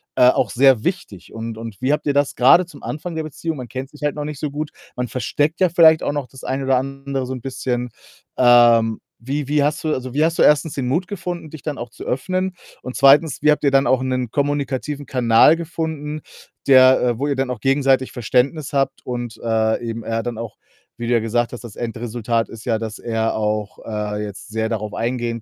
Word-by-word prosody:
äh, 125 Hz, -, +6 dB
auch -, -, +1 dB
sehr 130 Hz, -2 st, +4 dB
wichtig 175 Hz, -, -4 dB
und 115 Hz, 0 st, -5 dB
und 115 Hz, -3 st, -7 dB
wie 135 Hz, +3 st, +2 dB
habt 150 Hz, -, -2 dB
ihr 145 Hz, -, +2 dB
das 145 Hz, -1 st, +2 dB
grade 155 Hz, +8 st, +6 dB
zum 165 Hz, -4 st, -14 dB
Anfang 165 Hz, +3 st, -5 dB
der 160 Hz, -, -1 dB
Beziehung 155 Hz, +1 st, -5 dB
man 125 Hz, -2 st, -7 dB
kennt 130 Hz, +1 st, -6 dB
sich 150 Hz, -, -16 dB
halt 145 Hz, 0 st, 0 dB
noch 150 Hz, -, -4 dB
nicht 150 Hz, -2 st, -6 dB
so 150 Hz, -, -2 dB
gut, 150 Hz, +1 st, -4 dB, 0.2 s
man 125 Hz, 0 st, -2 dB
versteckt 145 Hz, -, -1 dB
ja 185 Hz, -, +5 dB
vielleicht 160 Hz, -2 st, +6 dB
auch -, -, -1 dB
noch 145 Hz, -2 st, -2 dB
das 135 Hz, -, -14 dB
eine 135 Hz, +1 st, -2 dB
oder 130 Hz, -1 st, +3 dB
andere 135 Hz, 0 st, -3 dB
so 130 Hz, -, -4 dB
'n 130 Hz, -, -6 dB
bisschen. 125 Hz, -1 st, -3 dB, 0.5 s
Ähm, 120 Hz, -2 st, +5 dB, 0.2 s
wie 140 Hz, +3 st, -3 dB
wie 150 Hz, -1 st, +2 dB
hast 150 Hz, +1 st, -1 dB
du 155 Hz, -1 st, 0 dB
also, 130 Hz, -1 st, -4 dB
wie 150 Hz, +3 st, +2 dB
hast 165 Hz, +1 st, -1 dB
du, -, -, +6 dB
1. 150 Hz, 0 st, +4 dB
den 130 Hz, -3 st, -2 dB
Mut 165 Hz, +8 st, 0 dB
gefunden, 175 Hz, -4 st, -5 dB
dich 155 Hz, -1 st, -10 dB
dann 150 Hz, -3 st, -4 dB
auch 120 Hz, -, -6 dB
zu -, -, -10 dB
öffnen? 185 Hz, +7 st, -2 dB, 0.3 s
Und 125 Hz, -, -6 dB
2. 140 Hz, +2 st, +5 dB
wie 150 Hz, -, +5 dB
habt 150 Hz, -, 0 dB
ihr 140 Hz, -, +4 dB
dann 135 Hz, +1 st, +4 dB
auch 130 Hz, -1 st, +3 dB
'nen 130 Hz, -3 st, -2 dB
kommunikativen 145 Hz, 0 st, -2 dB
Kanal 125 Hz, +4 st, +5 dB
gefunden, 160 Hz, -2 st, -4 dB, 0.5 s
der 130 Hz, -1 st, +7 dB
äh, 120 Hz, -2 st, 0 dB
wo 140 Hz, -, 0 dB
ihr 140 Hz, -, 0 dB
dann 135 Hz, -1 st, -1 dB
auch 120 Hz, -, -5 dB
gegenseitig 135 Hz, -1 st, +2 dB
Verständnis 130 Hz, +5 st, 0 dB
habt 135 Hz, -1 st, -1 dB
und, 120 Hz, -2 st, -5 dB
äh, 110 Hz, 0 st, +1 dB
eben 115 Hz, 0 st, -5 dB
er 115 Hz, +1 st, -2 dB
dann 120 Hz, -2 st, -4 dB
auch 115 Hz, -2 st, -7 dB, 0.4 s
wie 120 Hz, 0 st, -4 dB
du 120 Hz, -, +1 dB
ja 120 Hz, -, +4 dB
gesagt 120 Hz, +2 st, -1 dB
hast, 125 Hz, -, -8 dB
das 115 Hz, -4 st, -10 dB
Endresultat 115 Hz, -1 st, -2 dB
ist 115 Hz, -1 st, -11 dB
ja, 115 Hz, -2 st, +1 dB
dass 110 Hz, -1 st, -6 dB
er 115 Hz, -1 st, -1 dB
auch, 105 Hz, -1 st, -2 dB
äh, 105 Hz, -1 st, -3 dB
jetzt 105 Hz, +6 st, -8 dB
sehr 110 Hz, +1 st, -1 dB
darauf 105 Hz, -2 st, -3 dB
eingehen 120 Hz, -1 st, -2 dB
130 Hz, 230 wpm, -20 LUFS, 115-145 Hz, 0.5 s, der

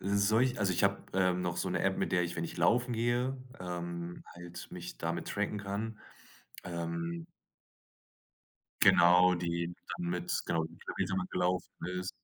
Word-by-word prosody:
Solch 110 Hz, +6 st, +3 dB
Also 95 Hz, -3 st, +2 dB
ich 85 Hz, -, 0 dB
habe, 100 Hz, 0 st, +2 dB
ähm, 90 Hz, -1 st, +2 dB
noch 90 Hz, -1 st, -1 dB
so -, -, 0 dB
'ne -, -, 0 dB
App, -, -, +2 dB
mit -, -, 0 dB
der 90 Hz, -, +4 dB
ich, 85 Hz, 0 st, -4 dB
wenn 80 Hz, -, -1 dB
ich -, -, -6 dB
laufen 120 Hz, +8 st, +3 dB
gehe, 120 Hz, +3 st, +1 dB, 0.2 s
ähm, 85 Hz, -1 st, -5 dB
halt 85 Hz, 0 st, -9 dB
mich 90 Hz, 0 st, -7 dB
damit 85 Hz, +1 st, -2 dB
tracken 105 Hz, 0 st, -1 dB
kann, 105 Hz, +3 st, -3 dB, 0.7 s
ähm. 85 Hz, -1 st, -3 dB, 1.6 s
Genau, 90 Hz, +1 st, +7 dB
die 85 Hz, -1 st, -1 dB, 0.3 s
dann 85 Hz, -, -3 dB
mit 90 Hz, 0 st, -2 dB
Genau, 80 Hz, -1 st, +1 dB
wie -, -, -6 dB
viel -, -, -16 dB
Kilometer -, -, -2 dB
man 90 Hz, -1 st, 0 dB
gelaufen 90 Hz, 0 st, 0 dB, 0.3 s
ist. 90 Hz, +1 st, -3 dB
90 Hz, 165 wpm, -32 LUFS, 85-100 Hz, 1.6 s, Genau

